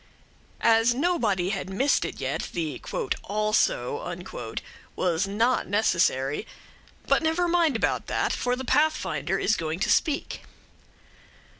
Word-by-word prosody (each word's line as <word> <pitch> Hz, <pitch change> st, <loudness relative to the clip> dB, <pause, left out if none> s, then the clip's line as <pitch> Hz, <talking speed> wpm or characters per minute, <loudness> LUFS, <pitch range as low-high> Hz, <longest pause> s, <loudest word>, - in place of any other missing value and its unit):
As 230 Hz, +1 st, +5 dB
nobody 235 Hz, -, +1 dB
had 195 Hz, -2 st, -3 dB
missed 265 Hz, +9 st, +2 dB
it -, -, -6 dB
yet, -, -, -3 dB
the 155 Hz, -6 st, -3 dB, 0.4 s
"also" 215 Hz, -, -1 dB, 0.4 s
was 180 Hz, +1 st, 0 dB
not 230 Hz, +6 st, +1 dB
necessary; 170 Hz, -, +1 dB, 0.6 s
but -, -, +3 dB
never 325 Hz, +2 st, +1 dB
mind 335 Hz, -5 st, +2 dB
about 225 Hz, -, 0 dB
that, -, -, 0 dB
for 245 Hz, 0 st, 0 dB
the 260 Hz, +1 st, -6 dB
Pathfinder 310 Hz, +5 st, +1 dB
is 220 Hz, -, +2 dB
going 160 Hz, -1 st, -3 dB
to -, -, +2 dB
speak. 295 Hz, -2 st, 0 dB
225 Hz, 120 wpm, -26 LUFS, 190-300 Hz, 0.6 s, As